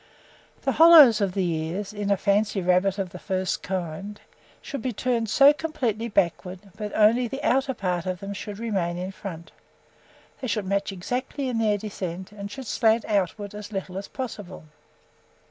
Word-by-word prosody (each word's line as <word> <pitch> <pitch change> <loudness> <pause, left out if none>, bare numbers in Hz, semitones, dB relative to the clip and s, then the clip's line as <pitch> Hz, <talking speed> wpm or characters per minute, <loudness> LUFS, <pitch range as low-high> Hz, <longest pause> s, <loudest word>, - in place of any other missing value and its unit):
The - - +1
hollows 310 -9 +8
of 195 -2 0
the 190 -2 +1
ears, 170 +5 -3
in 205 -1 -3
a 200 - +3
fancy 205 +1 +1
rabbit 185 +2 +2
of 190 -2 -4
a 180 - -8
first 185 0 -2
rate - - -12
kind, 190 +3 -4 0.4
should 280 - -6
be 255 - -2
turned 235 -1 -1
so 275 +6 +7
completely 250 -8 -2
backwards 180 -2 -1
that 210 -1 -4
only 230 +3 +4
the 270 +4 -6
outer 265 +1 +1
part 180 -3 -2
of 185 -1 -2
them 200 +1 -6
should 205 0 -7
remain 195 -7 -2
in 185 +2 -4
front: 175 -4 -8 0.9
they 260 - -4
should 210 -3 -1
match 200 +1 -1
exactly 255 +8 -3
in 235 -2 -1
their 215 -2 +2
descent, 190 -3 -6
and 200 -1 -7
should 265 +5 -8
slant 225 0 +2
outwards 205 0 -1
as 210 0 -8
little 190 -2 -5
as 195 +1 -5
possible." 210 - -7
205 Hz, 180 wpm, -25 LUFS, 185-230 Hz, 0.9 s, hollows